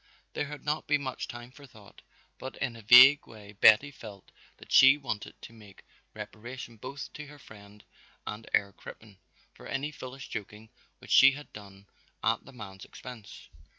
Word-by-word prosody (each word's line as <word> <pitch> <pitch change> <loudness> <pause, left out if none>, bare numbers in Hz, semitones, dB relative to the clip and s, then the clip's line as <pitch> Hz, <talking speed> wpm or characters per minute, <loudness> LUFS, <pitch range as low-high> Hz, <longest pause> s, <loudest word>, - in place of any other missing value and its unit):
There 145 - -3
had 145 -1 -10
not 150 +1 -2
been 145 -1 +1
much 130 -1 -5
time 120 0 -10
for 140 +1 -15
thought, 105 -5 -18 0.4
but 130 - -8
in 120 - -3
a 115 - -11
vague 125 +6 +8
way 105 -2 -13
Betty 110 +7 +5
felt 105 -7 -13 0.3
that - - -16
she 135 +2 +7
wanted 130 -7 -6
to - - -11
make 105 -4 -17 0.3
reparation 115 +3 -9
both 140 +6 -8
to 150 0 -9
her 145 0 -14
friend 105 -5 -16 0.4
and 105 +1 -7
Herr 100 -1 +1
Crippen 105 -3 -14 0.3
for - - -13
any 140 +3 -3
foolish 135 -1 -10
joking 105 0 -8 0.3
which - - -13
she 135 +1 +7
had 145 +1 -11
done 100 -1 -13 0.4
at - - 0
the 135 - -14
man's 100 -6 -11
expense. 125 -5 -12
120 Hz, 175 wpm, -29 LUFS, 105-135 Hz, 0.4 s, vague